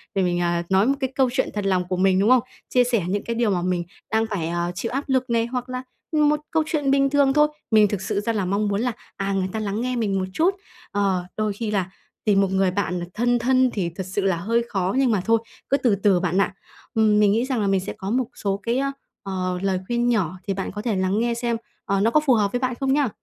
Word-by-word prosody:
để 195 - +2
mình, 175 -1 +1
à, 175 0 0
nói 190 +2 +4
một 275 - +3
cái 265 -2 -1
câu 265 -1 +3
chuyện 260 - 0
thật 205 -1 -3
lòng 185 -2 +1
của 185 - -2
mình, 185 0 +3
đúng 205 +3 +3
không? 255 -2 +5 0.3
Chia 250 - +4
sẻ 240 -6 +1
những 200 +2 -1
cái 235 - -3
điều 235 -2 +1
mà 180 -2 0
mình 180 -1 0 0.3
đang 220 0 +2
phải, 185 -7 -2
ờ, 175 0 -1
chịu 225 +6 -3
áp 275 +2 -1
lực 260 -1 +1
này, 230 -1 +2
hoặc 250 +1 -4
là 255 0 -4 0.3
một 300 -1 +3
câu 320 -1 +2
chuyện 295 -3 0
bình 275 0 +3
thường 280 -1 +3
thôi. 300 +1 +5 0.2
Mình 215 -1 +6
thực 200 -2 -3
sự 195 - -1
ra 230 +3 -1
là 205 -4 -1
mong 200 +3 0
muốn 205 +2 0
là, 245 - 0 0.3
à, 195 0 -1
người 190 -1 0
ta 220 - -3
lắng 210 +1 -2
nghe 255 0 -1
mình 205 -5 0
một 185 - -1
chút. 355 - +2 0.4
Ờ, 195 -3 0
đôi 215 -1 0
khi 215 +1 -4
là 190 -3 0 0.4
tìm 200 -2 +4
một 195 -1 +1
người 190 -1 +2
bạn 180 -2 -1
thân 240 +2 +1
thân 255 +1 +3
thì 185 -5 -1
thật 190 - -4
sự 190 +2 -2
là 190 -3 +1
hơi 230 +7 0
khó 190 -1 -1
nhưng 265 -3 +3
mà 205 -4 +1
thôi, 230 0 +4 0.3
cứ 275 - +3
từ 240 -7 +2
từ 195 -2 +3
bạn 180 +1 -1
ạ. 200 - 0 0.4
Ừm, 215 -2 +3
mình 205 -1 +5
nghĩ 230 +4 +1
rằng 260 -4 -1
là 205 - +1
mình 195 -1 +2
sẽ 185 - -5
có 190 - -5
một 250 +3 +1
số 200 -1 -2
cái, 240 +3 0 0.4
ờ, 185 -2 -2
lời 190 -1 0
khuyên 240 0 +1
nhỏ 185 -6 0
thì 195 - +1
bạn 195 0 -4
có 210 - -5
thể 225 -3 -1
lắng 190 +2 +1
nghe 235 +1 +1
xem, 235 0 -1 0.3
ờ, 195 -1 +1
nó 225 +3 +3
có 305 - +5
phù 295 -4 +3
hợp 205 -3 +2
với 245 - -1
bạn 255 -1 -1
không 270 -1 +1
nhá? 285 -4 +2
210 Hz, 275 wpm, -23 LUFS, 190-245 Hz, 0.4 s, Mình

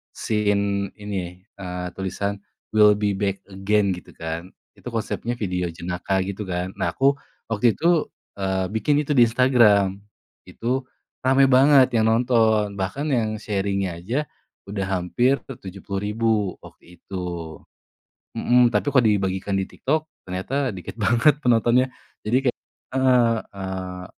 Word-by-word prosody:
scene 100 -2 0
ini, 95 -4 -6 0.2
eee, 90 -1 -5
tulisan 100 +1 -3 0.3
"we'll 105 -1 +6
be 105 0 0
back 100 0 -2
again" 100 +1 +1
gitu 90 -1 -8
kan, 80 +1 -5 0.3
itu - - -12
konsepnya 115 +1 -3
video 90 -6 -2
jenaka 90 +3 -2
gitu 100 +1 -5
kan, 90 0 -3
nah 85 -3 -1
aku 135 +1 +4 0.4
waktu 110 +1 +3
itu, 170 -1 +2 0.3
eee, 95 -1 0
bikin 145 +7 +1
itu 150 - -4
di 125 -5 +6
Instagram, 115 -6 +4 0.5
itu 125 +3 -2 0.5
rame 135 +1 +5
banget 135 0 +6
yang 110 - +3
nonton, 110 -3 +2
bahkan 135 +11 -2
yang 110 -5 0
sharing-nya 100 -4 -2
aja 120 - -3 0.4
udah 100 -1 -2
hampir 95 +9 +1
ke 135 - -10
70.000 100 +4 -2 0.3
waktu 90 +1 -16
itu. 85 -4 -6 0.8
Mhm, 125 0 +4
tapi 120 +5 0
kalau 130 -3 +4
dibagikan 95 -1 0
di 95 - 0
TikTok, 155 +10 -2 0.2
ternyata 130 +10 -2
dikit 95 +4 -8
banget 120 +8 +3
penontonnya, 120 0 +3 0.4
jadi 110 +4 +1
kayak - - -1 0.4
heeh, 125 -3 +4 0.2
eee, 95 -1 -5
105 Hz, 135 wpm, -23 LUFS, 95-120 Hz, 0.8 s, we'll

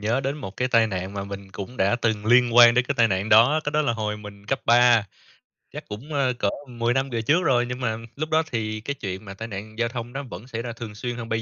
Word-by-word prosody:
nhớ 115 +5 0
đến 135 +2 -2
một 100 -9 -8
cái 125 0 0
tai 115 -2 +4
nạn 95 -1 -4
mà 100 0 -4
mình 100 -1 -8
cũng 105 +6 -8
đã 100 +5 +2
từng 110 -3 -1
liên 120 0 +4
quan 120 -1 +9
đến 125 0 +3
cái 140 - 0
tai 115 -1 +4
nạn 95 +2 -1
đó, 120 +8 +6
cái 145 - -1
đó 155 0 +2
là 125 -6 +1
hồi 105 -2 -3
mình 105 -1 -12
cấp 135 +2 -1
ba, 120 -2 +5 0.7
chắc - - -8
cũng, 125 +9 -8
ơ, 135 -3 +1
cỡ 100 - +2 0.2
10 120 0 -1
năm 135 +1 0
về 115 -2 -2
trước 155 +10 +2
rồi, 120 -2 +2
nhưng 125 +1 -5
mà 115 -3 -1 0.2
lúc 155 +2 -4
đó 160 +1 +3
thì 110 -2 -3
cái 140 +5 -3
chuyện 95 -5 -6
mà 95 - -8
tai 110 +3 -7
nạn 110 +1 -8
giao 115 -1 +1
thông 120 -1 -6
nó 140 +1 -4
vẫn 115 -2 -10
xảy 115 -3 -4
ra 120 -1 -5
thường 115 -3 -8
xuyên 120 +2 -4
hơn 115 -1 -7
bây 110 0 -1
115 Hz, 285 wpm, -24 LUFS, 105-125 Hz, 0.7 s, quan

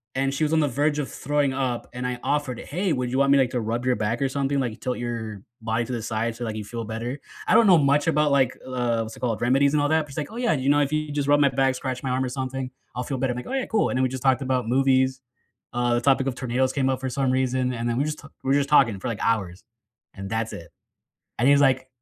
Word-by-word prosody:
and 135 +1 0
she 145 - -1
was 150 - +1
on 160 - +3
the 145 - +2
verge 145 +2 0
of 145 - -3
throwing 145 -1 0
up, 130 -3 -2
and 125 +1 -3
I 125 - -3
offered, 145 -5 -1
'Hey, 180 +5 -2
would 125 -1 -2
you 130 - 0
want 140 - +3
me, 140 - +6
like, 130 -2 +3
to 125 - -1
rub 115 +3 -2
your 125 - +2
back 110 +4 -1
or 135 - +1
something? 140 +1 -1
Like, 120 -3 -3
tilt 125 -1 -3
your 110 -4 -5 0.2
body 115 +1 -1
to - - -7
the 120 - -3
side 115 +1 -2
so, 120 - -6
like, 110 - -4
you 110 - -4
feel 115 +2 -5
better?'" 115 +5 -4 0.3
I - - +3
don't 230 - +6
know 180 -3 +7
much 145 +1 +2
about, 150 -2 +2
like, 130 -2 +2
uh, 120 -3 -1
what's 110 0 -6
it - - -13
called, 115 -4 -2
remedies 135 +4 +3
and 150 - +3
all 145 - +1
that. 160 +1 +3
But 150 - -19
she's - - -11
like, 150 +5 -3
"Oh, 230 - -8
yeah, 245 -2 +2
you 135 -2 0
know, 145 - +4
if 140 -1 +1
you 155 -1 -1
just 145 -1 -1
rub 145 0 +5
my 140 - +5
back, 135 0 +1
scratch 130 -1 -4
my 130 - -2
arm 130 +1 0
or - - -3
something, 130 0 -4 0.2
I'll 125 - -2
feel 135 +1 -3
better." 130 -1 0
I'm - - -7
like, 125 - -6
"Oh, - - -5
yeah. 270 -2 0
Cool," 220 -2 +1
and 130 - -1
then 130 - +2
we 130 - +3
just 130 0 -6
talked 130 0 +3
about 130 -2 0
movies, 130 +1 +2 0.5
uh, 120 0 +1
the - - +2
topic 135 +1 +3
of 130 - -2
tornadoes 130 +1 0
came 135 -2 +1
up 130 -1 0
for 130 - -2
some 130 0 0
reason, 130 -1 0
and 115 0 -3
then 120 - -1
we 140 - +1
just 155 0 -4
t 140 - -12 0.2
we're 135 - +2
just 140 0 +1
talking 125 -9 +4
for, - - -5
like, 110 - -4
hours, 100 -5 -1 0.5
and 95 0 -7
that's 110 +1 -2
it. 85 0 -9 0.7
And 125 - +3
he 145 - +7
was 145 - +4
like, 130 -1 +3
130 Hz, 305 wpm, -24 LUFS, 120-140 Hz, 0.7 s, know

